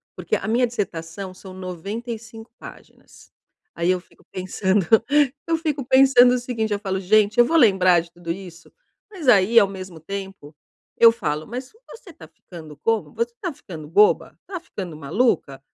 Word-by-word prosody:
Porque - - -2
a - - -4
minha 240 +3 +2
dissertação 185 -4 -5
são 185 0 -12
95 220 +5 -7
páginas. - - -15 0.4
Aí 170 +1 -1
eu 185 -1 +2
fico - - -24
pensando 190 0 -1 0.6
eu 330 -1 +1
fico 300 -4 -3
pensando 260 -2 +6
o 250 - 0
seguinte, 230 -3 -3
eu 200 - -2
falo: 190 -2 -3
"Gente, 210 +3 +2
eu 240 - +7
vou 330 +4 +2
lembrar 185 - +5
de 170 - -16
tudo 175 -1 -7
isso?". 170 -2 -10 0.4
Mas 345 -9 -8
aí, 225 +1 +6
ao 200 - +3
mesmo 185 -4 -9
tempo, 195 -4 -8 0.4
eu 230 -1 +8
falo: 155 -9 -3
"Mas 250 +3 -7 0.2
você 400 -5 -13
está 160 - -14
ficando 160 -2 -13
como? 205 -4 -1
Você 235 +1 -2
está 325 +9 -5
ficando 160 - -10
boba? 205 +6 +3
Está 370 -3 -7
ficando 185 - -8
maluca? 145 - -1
200 Hz, 170 wpm, -22 LUFS, 175-235 Hz, 0.6 s, eu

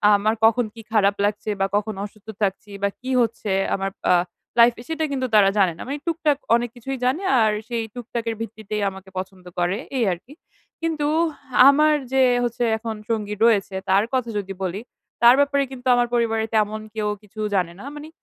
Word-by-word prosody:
আমার 215 +2 +1
কখন 230 +1 +4
কি 225 - -10
খারাপ 205 -2 +3
লাগছে? 210 +1 -2
বা 195 - +3
কখন 210 +1 0
অসুস্থ 210 +1 -15
থাকছি? 200 +1 -1
বা 200 - +3
কি 255 - -6
হচ্ছে 225 -3 -1 0.2
আমার 195 0 -2
পা - - +4 0.5
লাইফে? 235 0 +5
সেটা 320 -1 -1
কিন্তু 260 -2 -1
তারা 200 -2 +6
জানেনা। 180 -5 +2
মানে 275 +3 -3
এই - - -39
টুকটাক 315 -4 +1 0.2
অনেক 240 0 0
কিছুই 265 +3 -5
জানে 275 +10 +1 0.2
আর 215 -1 +4 0.2
সেই 235 -2 -1
টুকটাকের 235 -1 -4
ভিত্তিতেই 215 -2 -5
আমাকে 190 0 -12
পছন্দ 185 -1 -6
করে 175 +3 +1 0.2
এই 240 - +2
আরকি। 210 +11 -12 0.5
কিন্তু 315 -3 -1 0.6
আমার 305 +2 +4 0.2
যে 265 0 +5 0.2
হচ্ছে 240 0 -1
এখন 225 0 -5
সঙ্গী 210 -2 -1
রয়েছে 200 -4 +2
তার 195 +2 +4
কথা 255 -3 0
যদি 195 -1 -4
বলি, 190 +3 -3 0.4
তার 240 +1 +8
ব্যাপারে 280 0 +3
কিন্তু 255 0 -7
আমার 245 0 +2
পরিবারে 225 -2 +1
তেমন 215 0 +1 0.2
কেউ 215 -1 -1
কিছু 210 +1 -14 0.2
জানেনা। 180 +2 -2
মানে, 295 +1 -9
225 Hz, 180 wpm, -23 LUFS, 200-250 Hz, 0.6 s, তার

